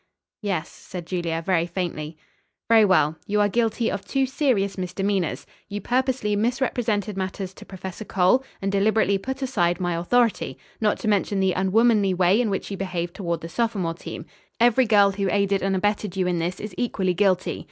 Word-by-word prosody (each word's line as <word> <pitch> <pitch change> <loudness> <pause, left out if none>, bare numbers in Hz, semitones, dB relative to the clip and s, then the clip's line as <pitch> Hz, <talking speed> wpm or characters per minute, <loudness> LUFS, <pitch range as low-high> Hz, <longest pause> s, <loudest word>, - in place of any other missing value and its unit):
"Yes," 190 -7 -2
said 180 -3 -9
Julia 170 -2 -2
very 175 -3 +2
faintly. 165 -3 -4 0.5
"Very 225 -1 +6
well. 160 -5 +3
You 210 +1 +1
are 205 - +4
guilty 225 +1 0
of 195 - -4
two 270 -1 0
serious 250 -8 0
misdemeanors. 185 0 -2 0.2
You 205 0 -4
purposely 250 -3 0
misrepresented 225 -3 0
matters 190 0 -4
to - - -13
Professor 190 +1 -7
Cole 195 +6 +2 0.2
and 195 - 0
deliberately 200 0 +2
put 265 +6 -4
aside 175 -10 +1
my 175 -1 -1
authority; 230 +7 +1 0.2
not 210 -2 +2
to 225 - -3
mention 205 -1 +1
the 190 -1 +2
unwomanly 200 +1 +3
way 185 +5 +4
in 230 - 0
which 195 +1 -3
you 195 - -4
behaved 175 -3 -3
toward 170 -4 -3
the 165 - -6
sophomore 200 -6 -1
team. 165 - -8 0.3
Every 240 +1 +4
girl 205 -2 +5
who 195 0 -1
aided 200 0 +1
and 195 0 0
abetted 205 0 -1
you 185 - +1
in 180 -1 0
this 175 +2 -2
is 210 -2 -6
equally 195 -6 0
guilty. 185 0 +1
195 Hz, 180 wpm, -24 LUFS, 180-220 Hz, 0.5 s, Very